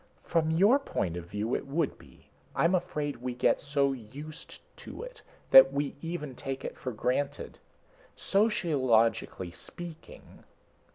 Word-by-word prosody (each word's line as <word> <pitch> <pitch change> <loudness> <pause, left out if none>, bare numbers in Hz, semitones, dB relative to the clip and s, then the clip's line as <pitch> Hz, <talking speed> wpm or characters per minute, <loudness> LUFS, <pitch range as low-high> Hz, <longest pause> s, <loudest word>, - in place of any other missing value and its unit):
"From 165 -2 +1
your 200 - +5
point 90 - -2
of 85 -1 -6
view, 105 +6 -3
it - - -4
would 150 +1 -1
be. - - -18 0.3
I'm 170 +3 +3
afraid 150 -7 -1
we 125 0 -4
get 125 - +2
so 140 -1 +1
used 145 +7 -8 0.2
to - - -9
it - - -10 0.3
that 135 0 +10
we 140 0 -2
even 165 -5 -4
take 135 +2 -5
it - - -5
for 130 - -5
granted. 125 +5 -2 0.6
Sociologically 135 - +2
speaking...." 165 - -9
145 Hz, 135 wpm, -29 LUFS, 125-170 Hz, 0.6 s, that